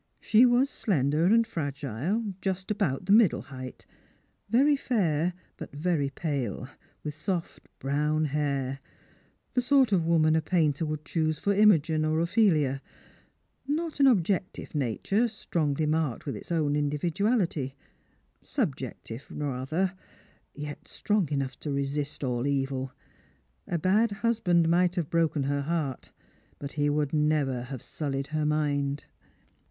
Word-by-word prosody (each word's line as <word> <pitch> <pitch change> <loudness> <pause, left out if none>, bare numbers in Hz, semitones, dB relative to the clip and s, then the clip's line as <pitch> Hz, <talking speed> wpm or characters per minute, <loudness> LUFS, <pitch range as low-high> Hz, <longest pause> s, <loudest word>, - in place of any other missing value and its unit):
She 230 +4 +5
was 245 +3 +4
slender 155 - +1
and 230 +5 +5
fragile, 150 - -3
just 190 0 -2
about 185 -8 -1
the 195 - 0
middle 215 -4 +5
height, 130 0 -8 0.6
very 275 +6 +4
fair 180 - 0 0.2
but - - -8
very 150 -2 0
pale, 135 - -3 0.4
with 150 - -4
soft 170 +2 -4
brown 150 +3 0
hair 140 -2 -1 0.4
— - - -37
the 250 - +2
sort 260 -2 +4
of 185 -4 +3
woman 160 -2 +4
a 160 - +3
painter 155 -2 +1
would 155 0 -4
choose 155 -1 0
for 200 - +1
Imogen 165 -7 +4
or 155 +1 +1
Ophelia; 165 - +2 0.9
not 310 +1 -2
an 275 - +6
objective 190 -5 +1
nature, 150 - 0
strongly 160 -9 -1
marked 155 -5 -1
with 140 - -3
its - - -9
own 150 -3 +1
individuality; 155 - 0 0.7
subjective 115 +4 -4
rather, 150 +7 -2 0.6
yet 145 0 -7
strong 205 -7 0
enough 135 -3 -2
to 150 - -5
resist 140 +1 -2
all 125 0 -1
evil. 135 -2 -1 0.8
^ 170 -2 0
bad 215 +5 +4 0.2
husband 180 -8 +3
might 175 +2 +3
have 170 -6 -2
broken 165 -3 +1
her 140 +1 0
heart, 145 -3 -3 0.5
but 140 0 -6
he 145 0 +1
would 145 -1 0
never 150 -5 +1
have 130 -2 -7
sullied 140 -2 -4
her 155 -1 +1
mind." 145 -2 0
155 Hz, 135 wpm, -28 LUFS, 140-185 Hz, 0.9 s, an